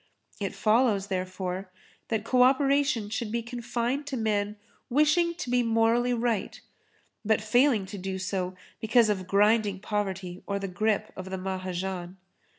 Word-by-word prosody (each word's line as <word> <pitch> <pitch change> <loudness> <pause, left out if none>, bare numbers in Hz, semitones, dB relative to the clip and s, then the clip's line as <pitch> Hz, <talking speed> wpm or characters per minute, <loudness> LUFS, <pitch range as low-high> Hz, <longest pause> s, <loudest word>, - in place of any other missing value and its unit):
It 195 -2 -3
follows, 215 -3 +2
therefore, 185 0 -3 0.4
that 220 -2 -1
co 250 +2 +2
operation 275 -3 +3
should 220 -1 -3
be 235 0 -1
confined 245 +3 -3
to 270 -3 -3
men 210 -2 0 0.3
wishing 305 +5 +3
to 345 - -6
be 250 0 +3
morally 230 +1 +2
right, 235 -4 -1 0.6
but 220 0 +2
failing 220 0 +3
to 200 +1 -8
do 190 +1 -3
so, 185 -1 -3 0.2
because 225 0 +4
of 190 -3 -3
grinding 205 0 +3
poverty 190 -3 -3
or 200 - -1
of 200 - -2
the 195 - -2
grip 210 +3 0
of 185 0 -7
the 190 - -3
Mahajan. 185 -1 -4
215 Hz, 155 wpm, -28 LUFS, 190-240 Hz, 0.6 s, because